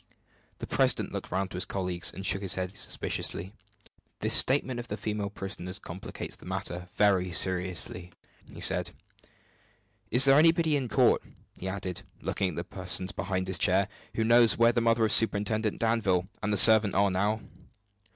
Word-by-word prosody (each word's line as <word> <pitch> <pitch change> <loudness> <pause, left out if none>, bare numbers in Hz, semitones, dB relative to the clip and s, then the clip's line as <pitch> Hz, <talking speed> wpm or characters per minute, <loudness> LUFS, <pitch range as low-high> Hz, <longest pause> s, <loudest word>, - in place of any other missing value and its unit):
The - - -6
president - - +1
looked - - -6
round 95 0 -2
at - - -9
his 90 - -1
colleagues, 90 -2 -1
and 95 - -8
shook 95 0 +2
his 95 -3 +2
head 95 +1 -4
suspiciously. 95 -1 -2 0.7
"This - - -1
statement 130 -2 +2
of 120 - -7
the 105 - -5
female 105 -1 -3
prisoner's 95 -2 -7
complicates 95 -1 -8
the - - -15
matter 90 -1 -5
very 95 -3 +2
seriously," 90 0 -2 0.5
said - - +2
he. - - -14 1.2
"Is 130 - +8
there 135 +1 +6
anybody 165 -1 +3
in 135 -3 -1
court," - - +3 0.3
he 95 - -7
added, 95 -2 -4 0.2
looking 95 - -2
at 85 - -8
the - - -4
persons 95 0 -1
behind 95 -1 -3
his 95 -3 0
chair, 95 +2 +3 0.3
"who 110 - 0
knows 115 -2 +4
where 115 0 +4
the 120 0 0
mother 115 0 +2
of 110 - 0
Superintendent 110 0 +2
Danville 105 -6 0
and 105 - -2
the 105 - +1
servant 110 0 +6
are 100 0 +2
now?" 105 +4 -1
100 Hz, 170 wpm, -28 LUFS, 95-110 Hz, 1.2 s, Is